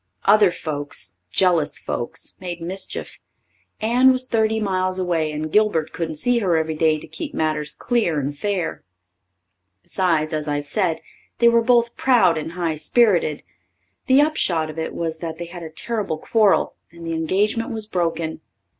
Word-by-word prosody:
Other 205 -1 +6
folks 145 - -5
jealous 170 - +2
folks 120 - -5
made 175 -2 -5
mischief. 185 +3 -5 0.6
Anne 245 +4 +5
was 255 0 0
thirty 220 -2 +1
miles 185 -2 0
away 170 -4 0
and 155 +1 -4
Gilbert 210 -7 +2
couldn't 160 -2 -3
see 245 +10 +1
her 180 -6 +2
every 160 0 -1
day 155 0 +2
to - - -9
keep 160 +1 -7
matters 155 -1 -1
clear 220 - 0
and 145 +1 -3
fair. 195 0 -2 1.0
Besides, 165 -5 0
as 155 0 -2
I've 145 0 -1
said, 165 +2 0 0.4
they 235 - +5
were 235 0 +4
both 235 0 +3
proud 225 -10 +4
and 160 +1 -4
high 170 -3 -2
sperrited. 170 -2 +2 0.6
The 265 +2 +6
upshot 175 - +1
of 160 - -8
it 160 - -4
was 165 -1 -3
they 165 0 -5
had 175 +1 -9
a 160 - -7
terrible 205 0 -2
quarrel 210 +4 +2 0.2
and 170 0 -11
the 165 - -2
engagement 205 - 0
was 220 -3 -3
broken. 165 -5 -2
170 Hz, 160 wpm, -22 LUFS, 155-215 Hz, 1.0 s, Other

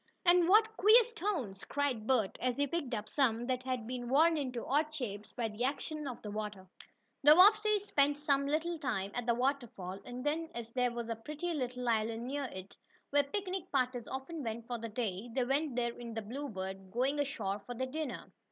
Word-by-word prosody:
"And 350 -1 +5
what 440 +2 +5
queer 440 +5 +7
stones!" 365 - -3
cried 265 -7 -1
Bert, 235 -7 +2
as 250 0 0
he 285 - +3
picked 280 -4 -2
up 210 0 -4
some 240 -3 +1
that 255 0 -1
had 255 -3 -3
been 245 0 -4
worn 320 +5 +5
into 255 -6 -3
odd 300 +3 +1
shapes 215 -9 -5
by 235 -2 -2
the 215 +2 -4
action 295 +2 -2
of 250 - -5
the 210 - -5
water. 210 -3 -5 0.5
The 295 +2 +8
Bobbseys 420 +2 +6
spent 285 -5 +2
some 280 -2 +1
little 320 +3 0
time 215 -9 -2
at 245 -1 -3
the 235 - +3
waterfall, 240 -8 -2
and 250 +2 -7
then, 320 +2 0
as 230 -1 -6
there 250 0 +2
was 235 -1 -4
a - - -1
pretty 300 +9 -4
little 250 -4 -3
island 225 0 0
near 280 +2 -2
it, 190 -5 -8 0.4
where 285 0 +5
picnic 370 +4 -4
parties 255 -3 0
often 270 +5 -5
went 230 0 -4
for 240 0 -4
the 230 0 -5
day, 215 -1 -3
they 260 - +2
went 275 +1 0
there 235 -1 0
in 235 -2 -8
the 225 - -3
Bluebird, 195 -6 -5
going 260 +7 0
ashore 275 -9 -1
for 245 +4 -8
their 260 +2 -1
dinner. 285 0 -5
255 Hz, 205 wpm, -33 LUFS, 230-295 Hz, 0.5 s, The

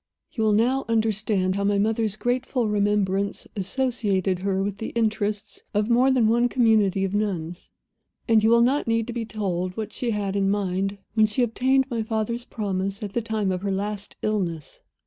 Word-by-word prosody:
"You 225 - -2
will 215 - +3
now 250 +6 +2
understand 215 -4 +1
how 200 - -1
my 200 0 +2
mother's 220 0 +1
grateful 245 0 0
remembrance 200 -1 0
associated 200 -3 0
her 195 0 0
with 200 0 -3
the 225 - -4
interests 215 -2 -1
of 210 +3 +1
more 250 +3 +4
than 250 -4 +3
one 240 +2 +3
community 215 -6 +3
of 195 0 -2
Nuns; 180 -5 -3 0.6
and 225 -2 +4
you 220 - +4
will 235 0 +5
not 270 +3 +1
need 230 -1 +1
to 240 - -6
be 235 -1 -3
told 185 -4 -3
what 215 -1 -4
she 245 - -2
had 205 -3 -1
in 195 -1 +2
mind 195 0 -1 0.2
when 220 -1 +4
she 230 +4 +1
obtained 260 +3 +2
my 230 -2 -1
father's 225 +2 -2
promise 195 -3 -3
at 200 -2 -5
the 235 - 0
time 215 -3 -1
of 180 -1 -2
her 200 0 -2
last 205 +1 -4
illness. 175 -8 -2
210 Hz, 185 wpm, -24 LUFS, 195-230 Hz, 0.6 s, will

